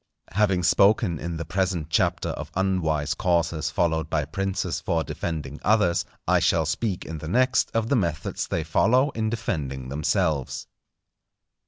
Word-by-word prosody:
Having 95 -2 +2
spoken 100 -1 +3
in 85 0 -4
the 85 - -4
present 90 -4 -1
Chapter - - +1
of - - -5
unwise 85 -6 0
courses 85 -3 0
followed 80 -2 0
by 75 -2 0
princes 95 +3 -2
for 80 -1 0
defending 75 -5 -5
others, 105 -6 +3 0.2
I - - +4
shall 80 -1 +2
speak 90 +4 -2
in 80 -1 -6
the 80 - -7
next, 130 +7 +2
of 115 -1 +1
the 140 - +3
methods 85 -9 -1
they 80 - -1
follow 125 - +3
in 110 -3 -1
defending 70 - -3
themselves. 75 0 0
85 Hz, 150 wpm, -25 LUFS, 80-100 Hz, 0.2 s, I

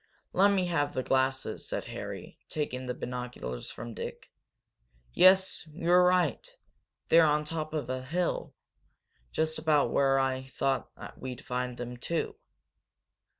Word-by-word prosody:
"Let 195 +2 +6
me 195 -2 +2
have 160 -5 0
the 130 - 0
glasses," 130 0 0
said - - -2
Harry, - - -7
taking 130 -4 -3
the 125 - -2
binoculars 125 - -5
from 115 0 -7
Dick. - - -7 0.8
"Yes, 190 +1 +5
you're 175 +2 +4
right! 180 - +3 0.7
They're 165 -1 +7
on 150 0 +2
the 150 - -10
top 155 -1 -3
of 150 - -2
a 130 0 -2
hill, 170 +7 -2 0.8
just 160 0 0
about 155 -2 +3
where 135 -1 +3
I 130 -1 +1
thought 135 0 -1 0.3
we'd 125 -2 -7
find 125 0 -2
them, 125 0 -6
too. 170 - -2
140 Hz, 140 wpm, -30 LUFS, 130-165 Hz, 0.8 s, They're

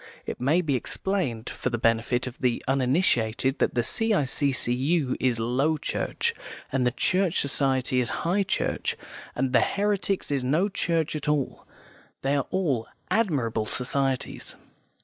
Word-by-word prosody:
(It - - -5
may 150 +8 +3
be 155 -5 -1
explained 130 - -2
for - - -3
the 120 - -1
benefit 115 +2 +1
of 130 0 -7
the 125 -3 0
uninitiated 130 -2 +2
that - - +1
the 120 - +2
C.I.C.C.U. 140 - +1
is 125 -3 +1
Low 135 +7 +1
Church, - - -1 0.4
and 130 -2 +2
the - - +2
Church 185 +7 +2
Society 135 -2 +1
is 125 - +1 0.2
High 185 +4 +2
Church, 195 - -1 0.4
and 130 0 0
the - - +6
Heretics 200 -3 0
is 140 -2 0
no 155 +10 +2
church 165 -5 0
at 150 - -2
all. 150 -3 -1 0.6
They 135 +1 +2
are 140 - 0
all 150 -12 0 0.2
admirable 130 - +1
societies). 135 +1 -1
135 Hz, 145 wpm, -26 LUFS, 125-165 Hz, 0.6 s, the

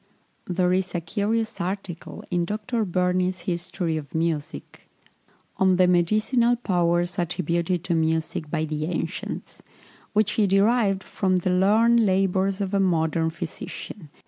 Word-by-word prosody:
There 180 0 +1
is 185 0 -1
a - - +1
curious 215 +6 -2
article 185 -1 -5
in 175 -1 +1
Dr. 215 +4 -2
Burney's 180 0 0
History 175 -1 -2
of 145 -2 -8
Music, 160 -2 -3 0.7
"On 190 -1 +4
the 180 0 +4
Medicinal 215 +7 +3
Powers 175 -5 0
attributed 175 0 -1
to 175 - -1
Music 160 -1 0
by 155 0 -1
the 155 0 -3
Ancients," 175 - -4 0.5
which 210 -1 +2
he 210 -2 +2
derived 195 0 +2
from 185 -2 0
the 180 0 +1
learned 220 +6 +4
labours 195 0 +1
of 195 0 -2
a 200 - +3
modern 160 -3 +1
physician, 170 +1 -7
M. - - -30
180 Hz, 140 wpm, -24 LUFS, 170-200 Hz, 0.7 s, On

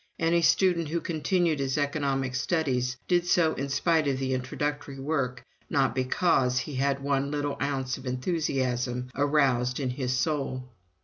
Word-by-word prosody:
Any 170 +1 +2
student 170 -1 +3
who 170 +3 -1
continued 170 -1 0
his 135 +1 -1
economic 140 -3 0
studies 130 -4 0
did 175 -1 +2
so 165 -3 +3
in 140 +1 -4
spite 155 +3 +2
of 135 -2 +1
the 130 0 -1
introductory 140 +2 -3
work, 135 -4 -2 0.2
not 135 -4 +2
because 130 0 +2
he 130 +4 -2
had 135 +1 +1
had 140 - -12
one 140 0 0
little 145 -1 -2
ounce 135 -2 -1
of 130 - -9
enthusiasm 125 -3 -1
aroused 135 -3 +2
in 130 -3 -1
his 125 0 -2
soul. 135 -4 -1
140 Hz, 160 wpm, -27 LUFS, 130-155 Hz, 0.2 s, student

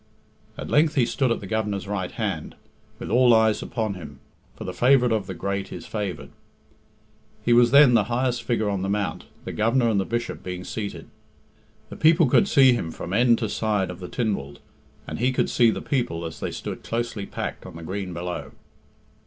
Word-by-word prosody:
At - - -6
length 155 +1 +3
he 125 - +4
stood 130 +1 0
at 115 - -1
the - - -7
Governor's 100 -1 -2
right 95 -3 -2
hand, - - -4 0.4
with - - -7
all 120 0 +6
eyes 110 -1 +3
upon 110 -4 -2
him, 75 -7 -10 0.4
for - - -8
the 90 - -5
favourite 125 +4 +4
of 105 -4 -1
the 95 - -5
great 100 +3 -3
is - - -7
favoured. 105 -4 -5 1.1
He 120 - +4
was 120 0 +6
then 140 -1 +7
the 115 - +4
highest 125 0 -1
figure 115 -3 -1
on 100 -2 -1
the 95 - -2
mount, 105 0 -2 0.2
the - - -4
Governor 115 +2 +2
and 105 -3 +2
the 95 - -1
Bishop 120 +3 -3
being 90 0 -6
seated. 105 0 -6 0.8
The - - -9
people 160 0 +5
could 160 - +4
see 135 -7 +6
him 100 -9 -2
from 85 +2 -6
end 120 +2 +4
to 110 - -2
side 105 -4 -1
of 90 - -10
the 90 - -7
Tynwald, 100 - -2 0.5
and - - -5
he 125 +3 +2
could 130 - 0
see 120 -2 +4
the - - -3
people 120 - -1
as 80 -1 -7
they - - -3
stood - - -6
closely 115 -3 -3
packed - - -5
on 90 - -11
the 85 - -9
green 95 +2 -4
below. 90 +1 -5
110 Hz, 200 wpm, -24 LUFS, 95-120 Hz, 1.1 s, then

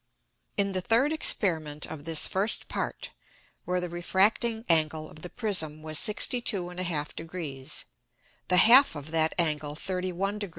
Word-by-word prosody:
In 200 -1 +2
the 185 -1 -2
third 240 - +2
Experiment 160 - +2
of 150 -2 -10
this 160 -2 +3
first 200 +4 +1
Part, - - -5 0.5
where 180 0 -1
the 180 - -4
refracting 205 +6 0
Angle 155 -1 +1
of 155 - -15
the 180 - -8
Prism 160 -9 0
was 155 0 +3
62 210 -2 +2
1/2 175 -4 -5
Degrees, 160 -6 -6 0.6
the 180 - +2
half 245 - +6
of 145 +1 -9
that 160 -1 +1
Angle 150 -3 -1
31 185 +3 -3
deg. 205 -2 -4
180 Hz, 145 wpm, -27 LUFS, 155-200 Hz, 0.6 s, half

